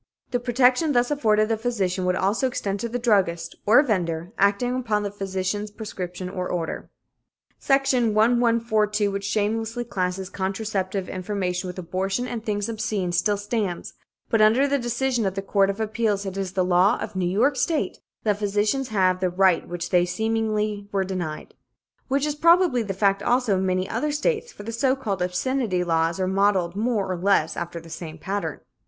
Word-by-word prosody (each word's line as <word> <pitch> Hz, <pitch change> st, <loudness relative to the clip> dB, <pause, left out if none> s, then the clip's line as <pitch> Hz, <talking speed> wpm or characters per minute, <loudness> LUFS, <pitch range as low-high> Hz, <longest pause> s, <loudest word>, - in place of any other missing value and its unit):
"The 245 Hz, -, +1 dB
protection 250 Hz, +5 st, +3 dB
thus 245 Hz, +2 st, +2 dB
afforded 215 Hz, -7 st, +2 dB
the 225 Hz, 0 st, 0 dB
physician 200 Hz, -6 st, -1 dB
would 180 Hz, 0 st, +2 dB
also 205 Hz, +8 st, +1 dB
extend 200 Hz, -5 st, -3 dB
to 235 Hz, -, -3 dB
the 245 Hz, -, -2 dB
druggist, 195 Hz, -8 st, +1 dB
or 235 Hz, +7 st, +7 dB
vendor, 175 Hz, -, -2 dB
acting 205 Hz, +5 st, +2 dB
upon 220 Hz, -5 st, 0 dB
the 200 Hz, -, -3 dB
physician's 195 Hz, +1 st, -3 dB
prescription 185 Hz, -4 st, -6 dB
or 180 Hz, 0 st, -4 dB
order." 170 Hz, -2 st, -3 dB, 0.7 s
Section 265 Hz, -5 st, +2 dB
1142, 220 Hz, -2 st, +2 dB
which 200 Hz, 0 st, -4 dB
shamelessly 225 Hz, +3 st, -1 dB
classes 190 Hz, -3 st, -3 dB
contraceptive 195 Hz, -1 st, -2 dB
information 185 Hz, -1 st, -3 dB
with 180 Hz, -, -7 dB
abortion 190 Hz, +6 st, -2 dB
and 230 Hz, -3 st, -5 dB
things 205 Hz, -2 st, -1 dB
obscene, 215 Hz, -5 st, -2 dB
still 200 Hz, +4 st, +1 dB
stands, 205 Hz, -3 st, -3 dB, 0.3 s
but 225 Hz, -2 st, +2 dB
under 230 Hz, +6 st, +5 dB
the 280 Hz, 0 st, +1 dB
decision 240 Hz, -1 st, 0 dB
of 190 Hz, -, -3 dB
the 195 Hz, -, -3 dB
Court 195 Hz, 0 st, +2 dB
of 200 Hz, +2 st, -3 dB
Appeals, 215 Hz, -2 st, 0 dB
it 190 Hz, -1 st, -5 dB
is 190 Hz, -2 st, -3 dB
the 185 Hz, -1 st, +1 dB
law 180 Hz, +2 st, +4 dB
of -, -, -6 dB
New 180 Hz, -2 st, 0 dB
York 245 Hz, +10 st, +2 dB
State 310 Hz, +5 st, -1 dB, 0.2 s
that 210 Hz, -2 st, +1 dB
physicians 210 Hz, +6 st, 0 dB
have 185 Hz, -4 st, +2 dB
the 185 Hz, -1 st, +1 dB
right 185 Hz, -1 st, +2 dB
which 175 Hz, 0 st, -5 dB
they 180 Hz, -, +5 dB
were 175 Hz, -, 0 dB
seemingly 215 Hz, 0 st, -1 dB, 0.2 s
denied. 175 Hz, -5 st, -5 dB, 0.6 s
Such 275 Hz, +2 st, +1 dB
is 300 Hz, -, -1 dB
probably 335 Hz, -3 st, +4 dB
the 200 Hz, -4 st, -4 dB
fact, 195 Hz, 0 st, +2 dB
also, 245 Hz, -4 st, +2 dB
in 190 Hz, 0 st, 0 dB
many 185 Hz, 0 st, 0 dB
other 300 Hz, +7 st, -1 dB
states, 445 Hz, +10 st, -1 dB
for 205 Hz, -, -11 dB
the 230 Hz, -, -5 dB
so 260 Hz, +3 st, +1 dB
called 205 Hz, -9 st, -3 dB
"obscenity" 185 Hz, +1 st, 0 dB
laws 165 Hz, 0 st, +1 dB
are 185 Hz, -, +1 dB
modelled 190 Hz, -2 st, +1 dB
more 215 Hz, -2 st, 0 dB
or 185 Hz, -, -2 dB
less, 175 Hz, -3 st, +2 dB
after 170 Hz, 0 st, -5 dB
the 165 Hz, 0 st, -13 dB
same 160 Hz, -1 st, -7 dB
pattern. 170 Hz, -3 st, -4 dB
205 Hz, 180 wpm, -24 LUFS, 185-235 Hz, 0.7 s, or